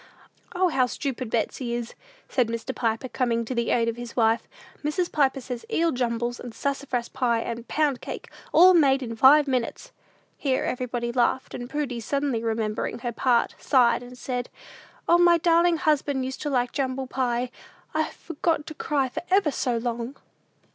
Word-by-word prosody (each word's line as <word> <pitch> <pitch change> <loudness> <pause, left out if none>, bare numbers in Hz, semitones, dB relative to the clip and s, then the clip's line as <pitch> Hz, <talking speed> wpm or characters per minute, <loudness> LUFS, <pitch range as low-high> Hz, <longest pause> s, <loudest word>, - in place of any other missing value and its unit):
"O, 365 0 +3
how 260 -5 +2
stupid 255 -2 -4
Betsey 235 +2 -1
is!" 240 -1 -5 0.3
said 250 -3 +1
Mr. 230 +3 -4
Piper, 230 +1 -1
coming 235 -2 0
to 255 - -4
the 235 -2 -1
aid 230 -1 +2
of 230 0 -2
his 240 -1 -8
wife. 225 -1 +2 0.4
"Mrs. 340 +4 -1
Piper 275 -2 +2
says 245 -2 -6
eel 335 0 +2
jumbles, 240 -1 -1
and 240 -2 -8
sassafras 275 -4 -2
pie, 240 -4 0
and 235 0 -5
pound 295 -4 0
cake; - - -7 0.2
all 365 +3 +8
made 275 -5 +4
in 230 -2 -5
five 285 +5 +6
minutes!" 255 -3 -2 0.5
Here 265 -3 0
everybody 245 -1 -2
laughed, 250 +1 0
and 245 0 -6
Prudy, 280 -5 -2
suddenly 275 0 -1
remembering 220 -1 -2
her 240 0 -4
part, 240 0 +2
sighed, 245 -3 +3
and 250 0 -11
said, 250 -1 -4 0.6
"O, 345 - +5
my 345 -1 +6
darlin' 340 0 +3
husband 285 -4 +1
used 260 0 -5
to 295 - -2
like 245 -3 +1
jumble 265 -1 -2
pie! 250 -1 -1 0.4
I've 315 0 -1
forgot 325 -1 -2
to 315 - -7
cry 290 -3 0
for 250 - -5
ever 375 -5 +3
so 245 -3 -1
long!" 235 +2 -3
255 Hz, 175 wpm, -25 LUFS, 235-290 Hz, 0.6 s, all